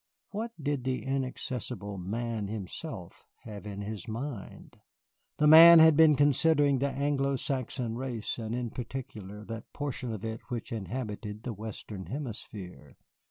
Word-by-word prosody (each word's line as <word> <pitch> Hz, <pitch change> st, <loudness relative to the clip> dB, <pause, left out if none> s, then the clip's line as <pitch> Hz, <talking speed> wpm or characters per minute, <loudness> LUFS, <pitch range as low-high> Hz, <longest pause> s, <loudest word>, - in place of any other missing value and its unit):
What 225 Hz, +3 st, -3 dB
did 145 Hz, -3 st, -1 dB
the 130 Hz, +1 st, -2 dB
inaccessible 125 Hz, -6 st, -3 dB
Man 110 Hz, +3 st, -3 dB
himself 105 Hz, -, -7 dB, 0.2 s
have 105 Hz, -2 st, -8 dB
in 100 Hz, -1 st, -5 dB
his 105 Hz, +2 st, -6 dB
mind? 115 Hz, 0 st, -6 dB, 0.6 s
The 150 Hz, -, +3 dB
Man 165 Hz, +2 st, +11 dB
had 160 Hz, -1 st, +8 dB
been 155 Hz, -1 st, +7 dB
considering 145 Hz, 0 st, +4 dB
the 140 Hz, +2 st, +1 dB
Anglo 140 Hz, 0 st, 0 dB
Saxon 130 Hz, -3 st, -2 dB
race, 120 Hz, -3 st, -3 dB
and 110 Hz, 0 st, -3 dB
in 120 Hz, -2 st, -3 dB
particular 110 Hz, -5 st, -7 dB
that 115 Hz, 0 st, -7 dB
portion 140 Hz, -4 st, -3 dB
of 110 Hz, -1 st, -5 dB
it 110 Hz, 0 st, -4 dB
which 120 Hz, -2 st, -4 dB
inhabited 105 Hz, 0 st, -5 dB
the 120 Hz, -, -3 dB
Western 105 Hz, -3 st, -7 dB
Hemisphere. 100 Hz, -, -7 dB
120 Hz, 140 wpm, -30 LUFS, 105-140 Hz, 0.6 s, Man